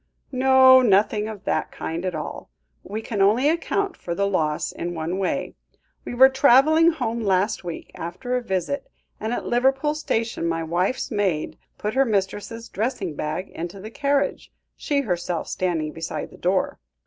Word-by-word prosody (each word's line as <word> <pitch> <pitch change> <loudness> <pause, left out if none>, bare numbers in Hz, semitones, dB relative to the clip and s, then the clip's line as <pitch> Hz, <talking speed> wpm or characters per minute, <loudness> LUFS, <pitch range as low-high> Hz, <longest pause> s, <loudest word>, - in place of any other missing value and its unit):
"No, 260 0 +7
nothing 210 -1 +3
of 210 -3 -8
that - - -1
kind 165 +3 -4
at 180 -2 -2
all. 150 - -6 0.3
We 215 +3 -6
can 210 -3 -2
only 220 +8 +4
account 345 +4 0
for 170 - -5
the 200 - +1
loss 155 -6 0
in 175 0 -5
one 165 +4 -3
way. 190 - -1 0.5
We - - -5
were 260 +2 +9
travelling 280 +5 +5
home 235 -8 -2
last 195 0 +1
week, 170 -2 -7
after 180 +10 -4
a 250 - 0
visit, 210 - -2 0.3
and 220 - -3
at 245 - -2
Liverpool 270 +4 +2
station 225 - -2
my 165 0 -1
wife's 180 +12 -1
maid 195 -8 -1 0.2
put 210 +1 -3
her 270 - +4
mistress's 215 +1 -2
dressing 205 - -2
bag 155 +6 -3
into 175 +4 -6
the 215 +3 -8
carriage, 280 +2 0 0.2
she 285 -1 0
herself 175 - -2
standing 165 -4 -1
beside 165 +1 -5
the - - -14
door. 185 +1 0
210 Hz, 165 wpm, -23 LUFS, 175-260 Hz, 0.5 s, were